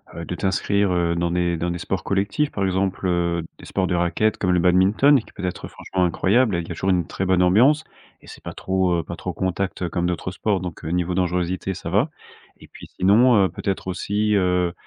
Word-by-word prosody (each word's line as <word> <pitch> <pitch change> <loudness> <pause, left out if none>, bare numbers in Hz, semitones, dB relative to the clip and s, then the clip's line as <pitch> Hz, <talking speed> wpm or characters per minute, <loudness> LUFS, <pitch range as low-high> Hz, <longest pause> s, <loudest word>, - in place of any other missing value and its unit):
heu, 85 - -6
de 90 - -4
t'inscrire, 100 +1 0
heu, 85 -1 +1
dans 85 0 -1
des 85 -1 0
dans 85 +2 -2
des 85 - -4
sports 95 +2 -3
collectifs. 100 +10 0
Par 100 - -2
exemple, 95 0 -1
heu, 85 -1 0
des - - -13
sports 95 -2 -1
de 90 - 0
raquette 90 +5 +1
comme 90 - 0
le 90 - +3
badminton 95 +11 +4
qui 110 - -13
peut 100 - -8
être 90 - -4
franchement 90 -1 -2
incroyable 100 +5 +2
et 85 - -1
qui 85 - -9
a - - -4
toujours 95 +3 0
une 90 -3 +1
très 95 - -3
bonne 95 -1 +2
ambiance 125 +13 +4 0.4
et - - -18
c'est - - -12
pas - - -6
trop, 95 -2 0
heu, - - -3
pas 85 - -7
trop 90 +1 -5
contact, 95 +2 -2
heu, 90 - -1
comme 85 +1 -1
d'autres 90 +1 -2
sports 100 +1 -1
donc 90 -3 -7
heu, - - -3
niveau 90 +1 -1
dangerosité 90 +1 -1
ça 85 - -7
va 105 - +2 0.5
et - - -16
puis - - -12
sinon, 110 +6 +5
heu, 95 - -1
peut-être 95 +3 -4
aussi, 105 +3 0
heu, 90 -2 +1
90 Hz, 235 wpm, -22 LUFS, 85-100 Hz, 0.5 s, sinon